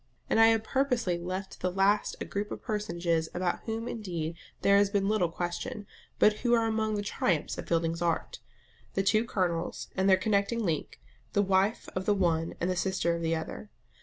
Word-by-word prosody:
And -, -, +4 dB
I 225 Hz, -, +8 dB
have 225 Hz, -1 st, +3 dB
purposely 240 Hz, -9 st, 0 dB
left 185 Hz, +3 st, -4 dB
to -, -, -12 dB
the 185 Hz, -, -1 dB
last 195 Hz, +3 st, +2 dB
a -, -, -4 dB
group 205 Hz, +1 st, -3 dB
of -, -, -6 dB
personages 170 Hz, -7 st, -1 dB
about 175 Hz, 0 st, 0 dB
whom 225 Hz, +1 st, -3 dB
indeed 170 Hz, -8 st, -4 dB, 0.3 s
there 200 Hz, 0 st, +6 dB
has 200 Hz, 0 st, +4 dB
been 200 Hz, -1 st, +1 dB
little 205 Hz, -5 st, +2 dB
question, 180 Hz, +7 st, -4 dB, 0.3 s
but 210 Hz, 0 st, +4 dB
who 240 Hz, -1 st, +3 dB
are 230 Hz, -1 st, +2 dB
among 220 Hz, -1 st, 0 dB
the 205 Hz, -, -2 dB
triumphs 175 Hz, -5 st, 0 dB
of -, -, -6 dB
Fielding's 165 Hz, 0 st, 0 dB
art 175 Hz, -, -1 dB, 0.6 s
the 195 Hz, -, +2 dB
two 215 Hz, +3 st, +3 dB
Colonels 180 Hz, -7 st, -2 dB
and 190 Hz, +1 st, +2 dB
their 190 Hz, -, +7 dB
connecting 210 Hz, +3 st, +1 dB
link, 160 Hz, -4 st, -2 dB, 0.3 s
the 205 Hz, -, +3 dB
wife 195 Hz, +3 st, +1 dB
of 185 Hz, 0 st, -3 dB
the 205 Hz, -, +4 dB
one 165 Hz, -3 st, +1 dB
and 175 Hz, -, 0 dB
the 185 Hz, -, 0 dB
sister 180 Hz, -2 st, 0 dB
of 170 Hz, -, -4 dB
the 165 Hz, 0 st, +1 dB
other. 160 Hz, +6 st, -6 dB
195 Hz, 200 wpm, -29 LUFS, 175-215 Hz, 0.6 s, I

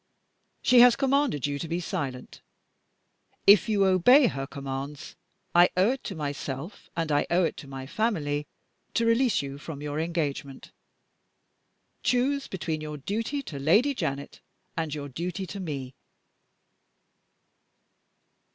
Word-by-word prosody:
She 250 Hz, -, +6 dB
has 245 Hz, -1 st, +8 dB
commanded 275 Hz, -, +1 dB
you 145 Hz, 0 st, -2 dB
to 165 Hz, -, -4 dB
be 170 Hz, +2 st, -2 dB
silent. 135 Hz, -6 st, -5 dB, 1.0 s
If 205 Hz, +3 st, +7 dB
you 200 Hz, -2 st, +3 dB
obey 195 Hz, -, +6 dB
her 135 Hz, -, -2 dB
commands, 140 Hz, +1 st, -6 dB, 0.4 s
I 175 Hz, +1 st, +7 dB
owe 190 Hz, +6 st, +4 dB
it 265 Hz, -, -5 dB
to 195 Hz, -, -4 dB
myself 145 Hz, +3 st, -5 dB
and 165 Hz, -2 st, -1 dB
I 145 Hz, 0 st, +2 dB
owe 180 Hz, +2 st, +3 dB
it 165 Hz, -, 0 dB
to 145 Hz, -, -9 dB
my 135 Hz, -1 st, -7 dB
family 150 Hz, -, -1 dB, 0.5 s
to 230 Hz, -, +2 dB
release 230 Hz, -, +3 dB
you 140 Hz, 0 st, -7 dB
from 150 Hz, -1 st, -7 dB
your 150 Hz, +1 st, -3 dB
engagement. 150 Hz, -5 st, -3 dB, 1.3 s
Choose 270 Hz, +3 st, +1 dB
between 160 Hz, -4 st, -3 dB
your 150 Hz, -1 st, -5 dB
duty 225 Hz, -, -3 dB
to 145 Hz, -, -7 dB
Lady 210 Hz, -, +4 dB
Janet 140 Hz, -, -4 dB, 0.4 s
and 160 Hz, -2 st, -2 dB
your 145 Hz, -1 st, -5 dB
duty 175 Hz, +7 st, -4 dB
to 200 Hz, -, -7 dB
Me." 140 Hz, -7 st, -5 dB
165 Hz, 135 wpm, -27 LUFS, 140-215 Hz, 1.3 s, has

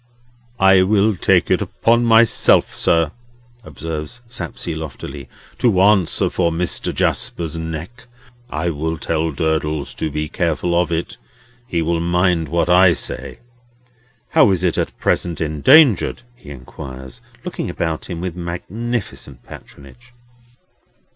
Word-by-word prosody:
"I 95 Hz, -1 st, +6 dB
will 105 Hz, +2 st, +2 dB
take 85 Hz, -, +2 dB
it -, -, +2 dB
upon 115 Hz, +1 st, +1 dB
myself, 115 Hz, -1 st, +4 dB
sir," 85 Hz, -3 st, +1 dB, 0.5 s
observes 80 Hz, +8 st, -6 dB
Sapsea 85 Hz, -6 st, -5 dB
loftily, 70 Hz, -3 st, -8 dB, 0.3 s
"to 110 Hz, -7 st, +2 dB
answer 95 Hz, -3 st, +3 dB
for 85 Hz, -2 st, 0 dB
Mr. 85 Hz, +2 st, -2 dB
Jasper's 85 Hz, -2 st, -2 dB
neck. 80 Hz, +9 st, -7 dB, 0.4 s
I 85 Hz, +2 st, -2 dB
will 80 Hz, +2 st, -3 dB
tell 80 Hz, +2 st, -1 dB
Durdles 75 Hz, 0 st, -2 dB
to 80 Hz, -, -2 dB
be 75 Hz, +1 st, -3 dB
careful 85 Hz, +1 st, -1 dB
of 85 Hz, 0 st, +1 dB
it. 85 Hz, +1 st, -3 dB, 0.5 s
He 85 Hz, -9 st, -1 dB
will 85 Hz, +1 st, 0 dB
mind 85 Hz, -2 st, +1 dB
what 85 Hz, +2 st, 0 dB
I 90 Hz, 0 st, +6 dB
say. -, -, -3 dB, 0.9 s
How -, -, +5 dB
is 95 Hz, -2 st, 0 dB
it 90 Hz, -, +1 dB
at -, -, -3 dB
present 85 Hz, -3 st, -1 dB
endangered?" 110 Hz, -, +4 dB
he 120 Hz, -, -15 dB
inquires, 65 Hz, -1 st, -10 dB, 0.2 s
looking -, -, -4 dB
about 80 Hz, -1 st, -3 dB
him 85 Hz, -2 st, -5 dB
with 90 Hz, -2 st, -4 dB
magnificent 90 Hz, -, -5 dB
patronage. 120 Hz, -, -14 dB
85 Hz, 130 wpm, -19 LUFS, 80-95 Hz, 0.9 s, I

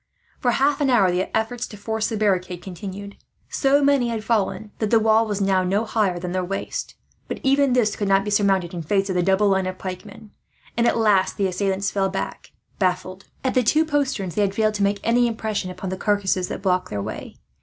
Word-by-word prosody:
For 250 Hz, -, +1 dB
half 280 Hz, +3 st, +2 dB
an 280 Hz, -, +2 dB
hour 200 Hz, -8 st, +4 dB
the 180 Hz, +1 st, -1 dB
efforts 235 Hz, +2 st, -2 dB
to 210 Hz, -, -11 dB
force 220 Hz, +2 st, -2 dB
the 220 Hz, -, -3 dB
barricade 185 Hz, -4 st, 0 dB
continued. 195 Hz, +2 st, -8 dB, 0.3 s
So 280 Hz, +1 st, +2 dB
many 280 Hz, -3 st, +3 dB
had 225 Hz, -2 st, -3 dB
fallen 220 Hz, -1 st, -1 dB
that 215 Hz, -, 0 dB
the 230 Hz, -, +5 dB
wall 220 Hz, +1 st, +3 dB
was 205 Hz, -1 st, -2 dB
now 190 Hz, -1 st, +2 dB
no 200 Hz, +5 st, 0 dB
higher 215 Hz, -5 st, 0 dB
than 175 Hz, 0 st, -4 dB
their 185 Hz, 0 st, -1 dB
waist; 195 Hz, +2 st, -4 dB, 0.3 s
but -, -, -5 dB
even 275 Hz, -1 st, +3 dB
this 230 Hz, -4 st, +2 dB
could 205 Hz, -, -2 dB
not 195 Hz, 0 st, +3 dB
be 210 Hz, -, -3 dB
surmounted, 195 Hz, -4 st, +2 dB
in 175 Hz, -, -4 dB
face 195 Hz, +5 st, 0 dB
of -, -, -2 dB
the 180 Hz, -, +2 dB
double 195 Hz, +3 st, +3 dB
line 190 Hz, -1 st, +1 dB
of 185 Hz, 0 st, -5 dB
pikemen; 200 Hz, +3 st, -8 dB, 0.4 s
and 235 Hz, 0 st, +2 dB
at -, -, +2 dB
last 210 Hz, -4 st, +2 dB
the 200 Hz, -, +1 dB
assailants 195 Hz, +1 st, -1 dB
fell 195 Hz, -1 st, 0 dB
back, 195 Hz, -, -5 dB, 0.3 s
baffled. 185 Hz, 0 st, -1 dB, 0.2 s
At 260 Hz, -, 0 dB
the 255 Hz, -, +3 dB
two 305 Hz, +7 st, +3 dB
posterns, 270 Hz, -, -1 dB
they 210 Hz, -, 0 dB
had 200 Hz, -1 st, 0 dB
failed 215 Hz, 0 st, +2 dB
to 205 Hz, -1 st, -1 dB
make 200 Hz, 0 st, +1 dB
any 240 Hz, +1 st, +3 dB
impression 220 Hz, -4 st, -3 dB
upon 185 Hz, +1 st, -6 dB
the 190 Hz, -, -3 dB
carcasses 190 Hz, -3 st, 0 dB
that -, -, -6 dB
blocked 185 Hz, -1 st, +1 dB
their 105 Hz, -, -3 dB
way. 100 Hz, -, -6 dB
205 Hz, 225 wpm, -23 LUFS, 190-225 Hz, 0.4 s, the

